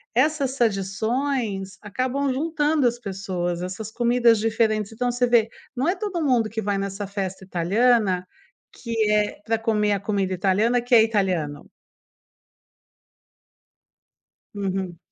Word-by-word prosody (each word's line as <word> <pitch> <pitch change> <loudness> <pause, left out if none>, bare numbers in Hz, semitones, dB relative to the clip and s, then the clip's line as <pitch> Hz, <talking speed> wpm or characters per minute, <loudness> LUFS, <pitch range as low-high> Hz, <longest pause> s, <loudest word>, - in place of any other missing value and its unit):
essas 275 0 +2
tradições 220 -1 -1
acabam 255 +6 -1
juntando 300 -1 +1
as 240 0 -2
pessoas, 185 -4 -3
essas 195 +4 -5
comidas 240 -1 +3
diferentes. 215 -1 +1
Então, 245 +2 -1
você 245 0 +1
vê, 230 -2 +3 0.3
não 260 +5 0
é 365 - +1
todo 370 -4 -3
mundo 240 -6 +2
que 220 0 -3
vai 200 0 -1
nessa 195 +1 -4
festa 190 -1 -4
italiana 190 +1 +2 0.5
que 225 -3 -1
é 210 -1 +1
para 225 0 +1
comer 210 -2 +1
a 200 - 0
comida 200 -2 -1
italiana 205 +7 +2
que 245 +1 +2
é 225 - +8
italiano. 185 -9 -1 2.8
Uhum. 190 -3 -3
220 Hz, 125 wpm, -24 LUFS, 195-245 Hz, 2.8 s, é